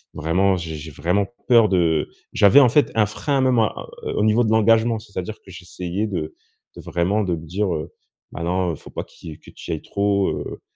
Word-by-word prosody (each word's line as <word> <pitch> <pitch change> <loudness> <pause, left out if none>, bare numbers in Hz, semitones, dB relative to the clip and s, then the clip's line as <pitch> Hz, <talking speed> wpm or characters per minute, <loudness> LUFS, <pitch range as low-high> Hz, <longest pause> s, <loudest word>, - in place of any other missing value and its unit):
vraiment 90 +5 +1
j'ai 80 -2 -5
j'ai 75 +1 -8
vraiment 90 +8 0 0.2
peur 115 -4 +6
de», 85 -4 +2 0.3
j'avais 100 +6 +6
en 125 - +6
fait 145 +5 +3
un 110 -2 +4
frein 135 +6 -1
même, 130 -1 +3
heu, 110 -3 -3
au 105 - +1
niveau 110 +3 +3
de 110 - 0
l'engagement. 110 +1 +3
C'est-à-dire 100 -1 -6
que 95 - -18
j'essayais 90 +2 -4
de 85 -6 -4 0.4
de - - -8
vraiment, 95 +5 0
de 90 -3 -1
me 80 - -9
dire, 95 +2 -1
heu: 75 - -5 0.4
«Bah, 85 - -5
non 90 0 0
il - - -7
faut - - -14
pas - - -4
qui, 80 - -11
heu 75 - -14
que - - -14
tu - - -8
y - - 0
ailles 80 - -8
trop, 100 -1 0
heu, - - -5
95 Hz, 225 wpm, -22 LUFS, 85-110 Hz, 0.4 s, peur